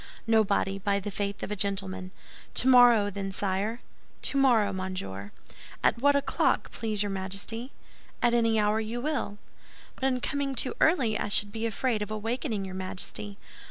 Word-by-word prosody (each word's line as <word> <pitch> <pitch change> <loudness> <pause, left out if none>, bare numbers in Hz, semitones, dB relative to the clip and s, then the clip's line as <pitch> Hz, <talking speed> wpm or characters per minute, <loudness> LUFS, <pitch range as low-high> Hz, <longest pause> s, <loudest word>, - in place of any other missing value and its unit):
"Nobody, 205 -3 +2
by 200 0 +1
the 205 +1 -5
faith 200 0 -3
of - - -4
a - - -1
gentleman." 195 -2 -3 0.5
"Tomorrow, 245 -5 +6
then, 195 0 -4
sire?" 200 +4 -2 0.4
"Tomorrow, 240 -7 +3
monsieur." 105 - -5 0.5
"At - - +3
what 285 +1 +5
o'clock, 280 - +1
please 215 -2 -1
your 205 - -2
Majesty?" 200 +6 -4 0.5
"At 240 -1 +2
any 230 -2 +3
hour 210 +1 +2
you 225 +2 -3
will." 265 -7 -2 0.6
"But 265 - -3
in 255 -1 +1
coming 275 +1 -2
too 255 +1 +1
early 260 -10 +3
I - - -1
should 205 0 +4
be 225 +1 -2
afraid 230 0 -1
of 210 - -3
awakening 220 0 -2
your 190 - -7
Majesty." 185 - -5
210 Hz, 160 wpm, -28 LUFS, 195-240 Hz, 0.6 s, Tomorrow